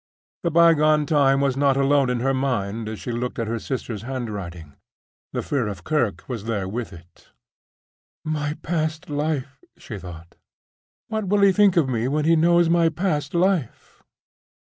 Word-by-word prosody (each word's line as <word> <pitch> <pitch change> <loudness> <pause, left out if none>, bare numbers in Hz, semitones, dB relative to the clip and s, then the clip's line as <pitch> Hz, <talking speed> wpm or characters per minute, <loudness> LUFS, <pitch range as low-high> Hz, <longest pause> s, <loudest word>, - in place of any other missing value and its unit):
The 170 - 0
bygone 155 -2 +4
time 140 -2 +3
was 135 -2 +1
not 140 -1 +2
alone 140 -1 +3
in 125 -1 -1
her 135 +2 +1
mind 115 -5 -2
as 110 - -6
she 120 - -5
looked 120 +1 -3
at 115 - -1
her 115 +1 -3
sister's 120 -4 -4
handwriting: 100 - -6 0.6
the - - -3
fear 130 -6 -1
of 100 -5 -6
Kirke 120 - -1
was 115 -5 -5
there 105 -4 -2
with 115 +3 -4
it. 85 0 -16 1.0
"My 150 -1 -2
past 155 -2 -2
life!" 145 -2 -3
she 105 -5 -8
thought. 85 -2 -11 0.8
"What 220 -2 -2
will 205 +2 +2
he 200 -1 +6
think 200 -2 +4
of 155 -5 +4
me 120 -2 -1
when 150 +2 0
he 165 +1 +5
knows 170 +1 +4
my 165 0 +3
past 160 -3 -2
life?" 175 - -1
135 Hz, 165 wpm, -23 LUFS, 115-155 Hz, 1.0 s, he